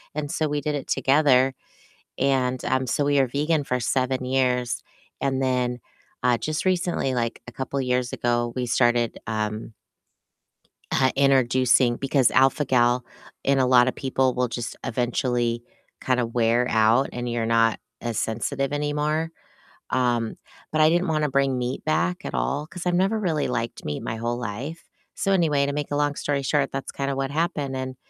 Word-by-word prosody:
and 150 Hz, -1 st, -3 dB
so 155 Hz, -, 0 dB
we 145 Hz, 0 st, -2 dB
did 150 Hz, +1 st, -1 dB
it 140 Hz, -, -5 dB
together. 135 Hz, -1 st, +3 dB, 0.7 s
And, 130 Hz, -2 st, +1 dB
um, 130 Hz, 0 st, +1 dB
so 145 Hz, +4 st, 0 dB
we 145 Hz, 0 st, +3 dB
were 135 Hz, -, +3 dB
vegan 145 Hz, +3 st, 0 dB
for 125 Hz, -1 st, -1 dB
7 130 Hz, +1 st, 0 dB
years, 125 Hz, -2 st, 0 dB, 0.4 s
and 135 Hz, -1 st, 0 dB
then, 125 Hz, -1 st, 0 dB, 0.4 s
uh, 125 Hz, -1 st, +3 dB
just 155 Hz, +7 st, -2 dB
recently, 175 Hz, -7 st, 0 dB
like 115 Hz, -2 st, -2 dB
a 125 Hz, -, -7 dB
couple 135 Hz, +2 st, -3 dB
years 125 Hz, -1 st, 0 dB
ago, 120 Hz, 0 st, 0 dB
we 125 Hz, -1 st, -2 dB
started, 120 Hz, -1 st, +2 dB
um 110 Hz, 0 st, -3 dB, 1.2 s
uh, 130 Hz, -1 st, +3 dB
introducing 130 Hz, -2 st, +3 dB
Because 135 Hz, -2 st, +2 dB
alpha-gal 125 Hz, -2 st, +3 dB, 0.4 s
in 140 Hz, 0 st, +2 dB
a 130 Hz, -, +3 dB
lot 125 Hz, -1 st, +6 dB
of 130 Hz, -, 0 dB
people 130 Hz, -1 st, 0 dB
will 125 Hz, 0 st, 0 dB
just 120 Hz, 0 st, -5 dB
eventually 120 Hz, -1 st, 0 dB, 0.4 s
kinda 125 Hz, -2 st, +1 dB
wear 115 Hz, +1 st, +2 dB
out 115 Hz, +4 st, +3 dB
and 120 Hz, 0 st, -3 dB
you're 120 Hz, -1 st, -1 dB
not 115 Hz, -1 st, +3 dB, 0.2 s
as 120 Hz, -3 st, -3 dB
sensitive 135 Hz, +6 st, -2 dB
anymore. 150 Hz, +2 st, -1 dB, 0.6 s
Um, 120 Hz, -3 st, +1 dB, 0.4 s
but 155 Hz, -, +1 dB
I 155 Hz, -, +7 dB
didn't 175 Hz, +3 st, +2 dB
wanna 155 Hz, -2 st, +1 dB
bring 135 Hz, -1 st, +2 dB
meat 125 Hz, +1 st, -3 dB
back 180 Hz, +4 st, 0 dB
at -, -, -5 dB
all 145 Hz, +2 st, -1 dB
'cause 180 Hz, +1 st, -9 dB
I've 175 Hz, -, +2 dB
never 195 Hz, +5 st, +2 dB
really 160 Hz, -7 st, 0 dB
liked 115 Hz, -2 st, -3 dB
meat 75 Hz, -, -4 dB
my 110 Hz, -, -3 dB
whole 120 Hz, +1 st, -2 dB
life. 125 Hz, +9 st, -5 dB, 0.3 s
So 195 Hz, -, 0 dB
anyway, 155 Hz, -7 st, +3 dB
to 140 Hz, -, -2 dB
make 145 Hz, 0 st, -3 dB
a 145 Hz, -, -1 dB
long 145 Hz, -1 st, 0 dB
story 140 Hz, -1 st, -1 dB
short, 140 Hz, 0 st, 0 dB
that's 135 Hz, 0 st, -4 dB
kinda 140 Hz, 0 st, -2 dB
what 135 Hz, 0 st, -2 dB
happened 145 Hz, -4 st, -1 dB
and 130 Hz, 0 st, -4 dB
130 Hz, 175 wpm, -24 LUFS, 120-145 Hz, 1.2 s, I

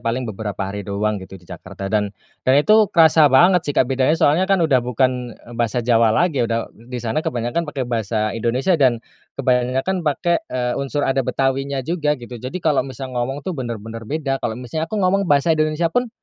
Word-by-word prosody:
paling 120 Hz, +2 st, -2 dB
beberapa 105 Hz, -2 st, -5 dB
hari 100 Hz, +1 st, -5 dB
doang, 100 Hz, +1 st, -2 dB
gitu, 95 Hz, +1 st, -10 dB
di 90 Hz, -, -19 dB
Jakarta. 95 Hz, +3 st, -8 dB
Dan 105 Hz, -1 st, +1 dB, 0.4 s
dan 130 Hz, -, +6 dB
itu 215 Hz, +8 st, +5 dB
kerasa 160 Hz, -2 st, +5 dB
banget, 175 Hz, +5 st, +4 dB
sih, 145 Hz, -, -2 dB
Kak, -, -, +5 dB
bedanya. 135 Hz, +4 st, +1 dB
Soalnya, 165 Hz, +5 st, +2 dB
kan, 190 Hz, -4 st, +3 dB
udah 135 Hz, -5 st, +3 dB
bukan, 125 Hz, 0 st, -1 dB
eee, 120 Hz, -, -12 dB
bahasa 120 Hz, 0 st, -1 dB
Jawa 115 Hz, -1 st, +4 dB
lagi. 140 Hz, +5 st, +1 dB
Udah 115 Hz, 0 st, -2 dB
di 120 Hz, +3 st, -10 dB
sana 115 Hz, +6 st, 0 dB
kebanyakan 125 Hz, +5 st, -2 dB
pakai 135 Hz, -3 st, -3 dB
bahasa 110 Hz, -2 st, -1 dB
Indonesia 125 Hz, -, 0 dB
dan 125 Hz, -4 st, +4 dB, 0.4 s
kebanyakan 130 Hz, +7 st, 0 dB
pakai, 170 Hz, +2 st, 0 dB
eee, 125 Hz, -1 st, -1 dB
unsur 140 Hz, +1 st, -2 dB
ada 135 Hz, 0 st, +1 dB
Betawinya 135 Hz, +1 st, -1 dB
juga, 150 Hz, -3 st, 0 dB
gitu. 120 Hz, -1 st, -11 dB
Jadi 130 Hz, +8 st, -5 dB
kalau 150 Hz, -3 st, +3 dB
misal 130 Hz, 0 st, -7 dB
ngomong, 130 Hz, +4 st, -3 dB
tuh, 185 Hz, -, -2 dB
benar-benar 115 Hz, -5 st, -6 dB
beda. 140 Hz, -3 st, -2 dB
Kalau 110 Hz, -1 st, -3 dB
misalnya 155 Hz, +6 st, -4 dB
aku 215 Hz, -, -4 dB
ngomong 195 Hz, -1 st, +1 dB
bahasa 145 Hz, +3 st, +3 dB
Indonesia, 155 Hz, +1 st, 0 dB
pun, 245 Hz, 0 st, +1 dB
130 Hz, 195 wpm, -20 LUFS, 115-155 Hz, 0.4 s, dan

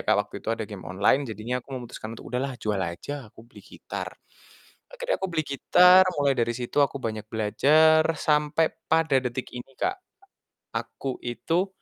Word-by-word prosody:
Kak, -, -, +4 dB
waktu -, -, -19 dB
itu -, -, -8 dB
ada 110 Hz, -, -4 dB
game 100 Hz, -3 st, -9 dB
online, 100 Hz, +9 st, +2 dB
jadinya 110 Hz, +4 st, -3 dB
aku 125 Hz, -, -28 dB
memutuskan 115 Hz, -2 st, -7 dB
untuk, -, -, -11 dB
"Udahlah 130 Hz, 0 st, -2 dB
jual 105 Hz, -4 st, -2 dB
aja, 110 Hz, +9 st, -5 dB
aku 110 Hz, -, -16 dB
beli 120 Hz, -, -16 dB
gitar." -, -, -7 dB, 0.8 s
Akhirnya -, -, -2 dB
aku 190 Hz, -, -1 dB
beli 155 Hz, -1 st, +1 dB
gitar, 180 Hz, +6 st, +6 dB
mulai 140 Hz, -1 st, +3 dB
dari 120 Hz, 0 st, +1 dB
situ 125 Hz, +4 st, -4 dB
aku 140 Hz, 0 st, +2 dB
banyak 110 Hz, -1 st, -4 dB
belajar, 155 Hz, +9 st, +4 dB
sampai 150 Hz, +1 st, +2 dB, 0.2 s
pada 160 Hz, -4 st, +3 dB
detik 125 Hz, 0 st, -4 dB
ini, 125 Hz, +2 st, -9 dB
Kak, 380 Hz, +1 st, 0 dB, 0.8 s
aku 135 Hz, -2 st, -4 dB
itu, 165 Hz, -, -1 dB
130 Hz, 170 wpm, -26 LUFS, 115-155 Hz, 0.8 s, gitar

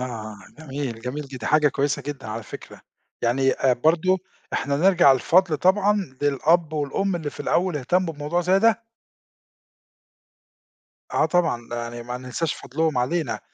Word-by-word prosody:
آه، 110 Hz, -4 st, -6 dB, 0.2 s
جميل، 135 Hz, -6 st, -5 dB
جميل 130 Hz, +5 st, -5 dB
جدًا، 135 Hz, -1 st, -9 dB
دي 110 Hz, -, -6 dB
حاجة 150 Hz, -1 st, +4 dB
كويسة 140 Hz, 0 st, -1 dB
جدًا 135 Hz, -3 st, -6 dB
على 110 Hz, +1 st, -5 dB
فكرة، -, -, -11 dB, 0.4 s
يعني 135 Hz, +3 st, +2 dB
آآ، 130 Hz, -, +2 dB
برضه 165 Hz, +8 st, +2 dB, 0.3 s
إحنا 140 Hz, 0 st, -1 dB
نرجَع 175 Hz, -4 st, +5 dB
الفضْل 165 Hz, +5 st, +3 dB
طبعًا 195 Hz, -3 st, +2 dB
للأب 150 Hz, +3 st, +2 dB
والأم، 160 Hz, +6 st, -1 dB
اللي 155 Hz, -4 st, -4 dB
في -, -, -11 dB
الأول 180 Hz, -3 st, 0 dB
اهتمّوا 165 Hz, +5 st, 0 dB
بموضوع 150 Hz, +4 st, -1 dB
زي 180 Hz, +2 st, +3 dB
ده. 225 Hz, +2 st, +3 dB, 2.3 s
آه -, -, +3 dB
طبعًا، 165 Hz, -10 st, 0 dB
يعني 120 Hz, 0 st, -5 dB
ما 125 Hz, +1 st, -5 dB
ننساش 130 Hz, +5 st, -3 dB
فضْلهم 155 Hz, +1 st, -2 dB
علينا 155 Hz, +7 st, -1 dB
145 Hz, 145 wpm, -23 LUFS, 125-175 Hz, 2.3 s, نرجَع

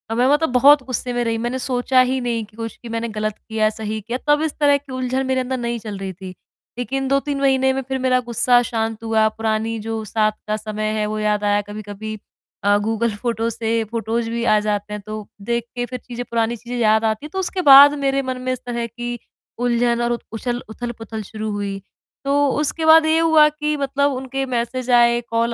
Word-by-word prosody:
मैं 245 Hz, +2 st, +3 dB, 0.2 s
बहुत 275 Hz, +3 st, +6 dB
गुस्से 255 Hz, -1 st, -3 dB
में 245 Hz, -, 0 dB
रही। 230 Hz, -1 st, -1 dB
मैंने 240 Hz, +3 st, -2 dB
सोचा 255 Hz, 0 st, +1 dB
ही 255 Hz, +1 st, +1 dB
नहीं 235 Hz, -2 st, -1 dB
कि 210 Hz, -, -24 dB
कुछ 225 Hz, -1 st, -6 dB
मैंने 230 Hz, 0 st, -2 dB
गलत 215 Hz, 0 st, -3 dB
किया, 220 Hz, -1 st, 0 dB
सही 220 Hz, 0 st, -4 dB
किया, 235 Hz, +4 st, -4 dB
तब 295 Hz, +1 st, +4 dB
इस 315 Hz, -2 st, -1 dB
तरह 285 Hz, -1 st, +5 dB
की 280 Hz, -1 st, -14 dB
उलझन 255 Hz, +1 st, -1 dB
मेरे 260 Hz, 0 st, +1 dB
अंदर 260 Hz, +1 st, -3 dB
नहीं 235 Hz, -1 st, -3 dB
चल 210 Hz, -2 st, -6 dB
रही 195 Hz, -1 st, -5 dB
थी। 185 Hz, 0 st, -10 dB, 0.4 s
लेकिन 270 Hz, +2 st, -2 dB
2-3 275 Hz, +1 st, 0 dB
महीने 265 Hz, -1 st, +3 dB
में 270 Hz, -, -2 dB
फिर 265 Hz, -1 st, -2 dB
मेरा 255 Hz, 0 st, +2 dB
गुस्सा 245 Hz, 0 st, +3 dB
शांत 225 Hz, -1 st, -2 dB
हुआ, 220 Hz, -1 st, +3 dB
पुरानी 220 Hz, +1 st, -2 dB
जो 220 Hz, 0 st, -4 dB
साथ 215 Hz, 0 st, +1 dB, 0.2 s
का 215 Hz, 0 st, 0 dB
समय 215 Hz, 0 st, -3 dB
है, 210 Hz, -, +1 dB
वो 215 Hz, 0 st, -3 dB
याद 210 Hz, -1 st, 0 dB
आया। 205 Hz, 0 st, +2 dB
कभी-कभी 215 Hz, +1 st, -6 dB, 0.5 s
अ, 205 Hz, 0 st, +4 dB
गूगल 225 Hz, +1 st, -1 dB
फोटोज़ 230 Hz, -1 st, -1 dB
से 225 Hz, 0 st, 0 dB
फोटोज़ 230 Hz, 0 st, -2 dB
भी 235 Hz, 0 st, -2 dB
आ 215 Hz, -3 st, +4 dB
जाते 210 Hz, 0 st, -2 dB
हैं, 210 Hz, -, -5 dB
तो 215 Hz, -1 st, -6 dB
देख 235 Hz, +2 st, -1 dB
के 245 Hz, 0 st, -1 dB
फिर 245 Hz, -1 st, -6 dB
पुरानी 230 Hz, 0 st, 0 dB
चीजें 245 Hz, +2 st, -7 dB
याद 220 Hz, -1 st, +3 dB
आती 220 Hz, +5 st, -1 dB
हैं, -, -, -7 dB
तो 380 Hz, -, -2 dB
उसके 375 Hz, 0 st, -2 dB
बाद 280 Hz, +2 st, +10 dB
मेरे 275 Hz, 0 st, +2 dB
मन 260 Hz, -1 st, -4 dB
में 255 Hz, -, -2 dB
इस 255 Hz, -, -5 dB
तरह 235 Hz, -1 st, -2 dB
की 240 Hz, +1 st, -5 dB, 0.4 s
उलझन 240 Hz, 0 st, +1 dB
और 240 Hz, 0 st, 0 dB
उ-उछल 240 Hz, +1 st, -4 dB
उथल-पुथल 225 Hz, -1 st, -6 dB
शुरू 215 Hz, +1 st, -5 dB
हुई। 200 Hz, -1 st, -4 dB, 0.4 s
तो 275 Hz, -, +1 dB, 0.3 s
उसके 310 Hz, +2 st, -1 dB
बाद 320 Hz, 0 st, +7 dB
ये 315 Hz, 0 st, +3 dB
हुआ 320 Hz, -2 st, +6 dB
कि 300 Hz, 0 st, -2 dB
मतलब 280 Hz, +1 st, +1 dB
उनके 265 Hz, +1 st, -3 dB
मैसेज 250 Hz, 0 st, -3 dB
आए, 240 Hz, 0 st, +5 dB
कॉल 230 Hz, +1 st, 0 dB
235 Hz, 210 wpm, -20 LUFS, 220-260 Hz, 0.5 s, बाद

